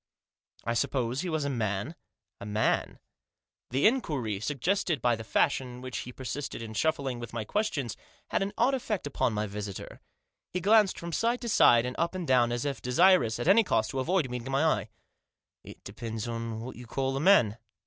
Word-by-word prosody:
" - - -33
I 115 - 0
suppose 125 +2 0
he 185 - -3
was 155 -3 -1
a - - 0
man? 110 +2 -2 0.2
" - - -59
" - - -62
A - - -6
man? 105 +1 0 0.4
" - - -64
The 130 +3 +1
inquiry, 145 - +1
suggested 150 - 0
by 120 0 +2
the 115 - -7
fashion 130 +3 +1
in 125 0 -10
which 130 -1 -5
he 125 - -7
persisted 130 +3 -5
in 110 -1 -7
shuffling 135 -1 0
with 120 -1 -8
my 115 -2 -3
questions, 145 - -1 0.3
had - - 0
an 195 +1 -1
odd 255 +4 +3
effect 230 - -2
upon 135 -3 0
my 105 0 -1
visitor. 100 -1 -7 0.5
He 180 - -2
glanced 210 +1 +4
from 170 0 -6
side 235 +7 +1
to 235 - -3
side, 120 - +6
and 125 0 -4
up 170 +2 0
and 180 -3 -4
down, 120 -2 +4
as 120 +3 -2
if 140 -2 -3
desirous, 130 -2 +4
at 120 - -3
any 215 +5 +6
cost, 110 - 0
to 135 - -3
avoid 165 +2 +1
meeting 125 +1 -5
my 135 +3 +2
eye. 160 - +1 0.4
" - - -63
It - - -13
depends 110 +2 -5
on 115 -1 -4
what 125 +3 -8
you 120 -1 -10
call 135 +3 -1
a - - -1
man." 125 - +4
130 Hz, 215 wpm, -29 LUFS, 115-170 Hz, 0.5 s, side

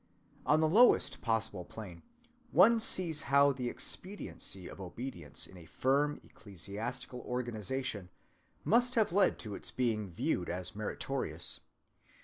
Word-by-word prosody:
On 155 +1 +5
the 160 - +4
lowest 225 +10 +5
possible 110 -5 0
plane, 90 -3 -9 0.5
one 215 +8 +6
sees 170 -8 +2
how 140 +1 +5
the 125 -2 -2
expediency 180 - -4
of - - -9
obedience 90 - -6
in 95 - -13
a 85 -2 -13
firm 145 - +1
ecclesiastical 110 +6 -6
organization 120 -4 -3 0.5
must 245 +3 +3
have 220 -5 +3
led 195 0 +4
to 105 -3 -6
its - - -5
being 110 -5 0
viewed 90 +1 -1
as 90 +2 -4
meritorious. 105 0 -2
125 Hz, 130 wpm, -33 LUFS, 100-150 Hz, 0.5 s, one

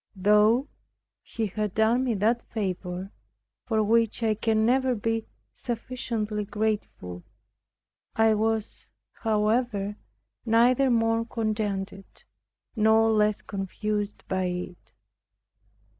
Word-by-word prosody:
Though 210 +7 +4 0.5
He 225 - -4
had 210 0 -3
done 225 +4 +3
me 240 -3 0
that 225 +4 +1
favor, 185 -2 -4 0.6
for 220 -2 +2
which 230 +1 +2
I 220 -1 +3
can 220 0 +1
never 255 +1 +2
be 225 +1 -2 0.3
sufficiently 230 -3 -3
grateful, 205 - -3 0.9
I 220 0 +4
was, 220 0 -1 0.3
however, 215 -1 0 0.5
neither 245 +4 +4
more 225 -1 +2
contented 210 -4 -3 0.7
nor 220 0 +4
less 210 -1 +2
confused 205 +1 -3
by 185 -1 0
it. 180 0 -5
215 Hz, 100 wpm, -26 LUFS, 205-230 Hz, 0.9 s, Though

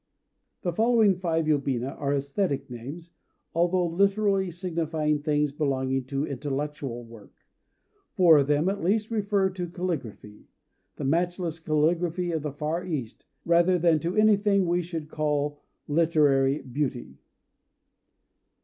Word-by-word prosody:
The 175 - -1
following 225 0 +4
five 165 -3 -1
yobina 135 -4 0
are 140 -1 0
æsthetic 140 0 -2
names, 145 +9 -8 0.4
although 175 +2 +2
literally 195 +2 +1
signifying 160 -4 -1
things 150 -1 +1
belonging 135 -3 -1
to 140 +2 -2
intellectual 140 -2 -4
work. 115 -3 -14 0.8
Four 170 -7 +7
of 140 - +1
them, 150 +3 +2
at 200 +1 -1
least, 210 +5 +1
refer 200 -3 +1
to 180 -2 -5
calligraphy, 155 - -5 0.5
the - - -6
matchless 170 +2 -1
calligraphy 165 +3 0
of 160 -2 -1
the 150 0 -4
Far 155 +5 -3
East, 135 -10 -5 0.2
rather 170 +2 +4
than 165 -2 +3
to 170 +4 -3
anything 205 -2 +4
that 170 - -1
we 175 +1 +2
should 165 -3 -6
call 150 -1 -2 0.3
"literary 145 -3 +2
beauty." 125 - -4
160 Hz, 130 wpm, -26 LUFS, 140-180 Hz, 0.8 s, Four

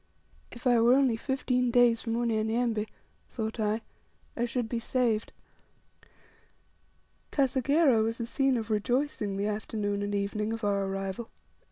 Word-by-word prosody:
If 240 - -12
I 245 -2 +5
were 240 +2 +6
only 265 -4 +3
fifteen 250 0 0
days 240 -1 +4
from 230 -1 -2
Unyanyembe, 225 -1 0 0.4
thought 220 -1 -4
I, 215 +1 0 0.5
I 240 - 0
should 245 -1 -2
be 235 +1 -2
saved! 230 -2 0 2.0
Kasegera 270 -1 +3
was 225 +2 -1
a 235 - -2
scene 270 +1 +1
of 220 -1 -4
rejoicing 215 -2 0
the 200 - -1
afternoon 210 -1 -2
and 205 0 -2
evening 210 +2 -1
of 225 0 -6
our 200 -1 +1
arrival. 195 +3 -4
230 Hz, 140 wpm, -29 LUFS, 215-245 Hz, 2.0 s, were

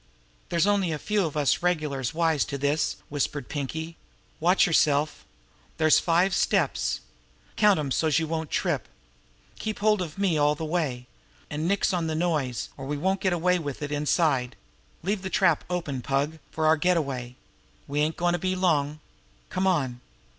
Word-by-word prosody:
"There's 170 +1 +2
only 200 -4 +2
a 155 - -1
few 205 +2 0
of 155 - -6
us 145 -3 +2
regulars 150 -7 0
wise 160 -3 +2
to 140 - -4
this," 145 +3 0
whispered 145 -2 -2
Pinkie. 160 +3 -4 0.4
"Watch 180 +4 +4
yourself! 150 -3 +2 0.5
There's 155 -1 +5
five 175 +3 +2
steps. - - +1 0.5
Count 210 -2 +5
'em, 140 -3 -3
so's 155 +2 +2
you 165 - +1
won't 160 -1 -3
trip. - - -1 0.7
Keep 215 -1 -3
hold 210 -1 +2
of 165 -2 -5
me 190 -6 +1
all 145 0 +3
the 160 - -4
way. 150 -7 -2 0.5
An' 155 +2 -2
nix 200 0 +1
on 170 -2 0
the 160 - -2
noise, 155 -7 -1
or 135 -1 -7
we 145 +1 -2
won't 190 +5 0
get 190 - +2
away 180 +1 +2
with 145 -2 -5
it 145 - -4
inside. 145 -3 +1 0.5
Leave 200 +2 -1
the 190 - -4
trap 170 -3 +3
open, 155 -8 -2
Pug, 140 +5 -1
for 160 - -2
our 160 +1 +5
getaway. 140 -8 0 0.5
We 145 +1 -2
ain't 155 +2 0
goin' 175 0 +1
to 175 - 0
be 185 +2 -1
long. 155 -5 +1 0.5
Come 185 +1 0
on!" 135 -9 0
160 Hz, 175 wpm, -26 LUFS, 145-180 Hz, 0.7 s, There's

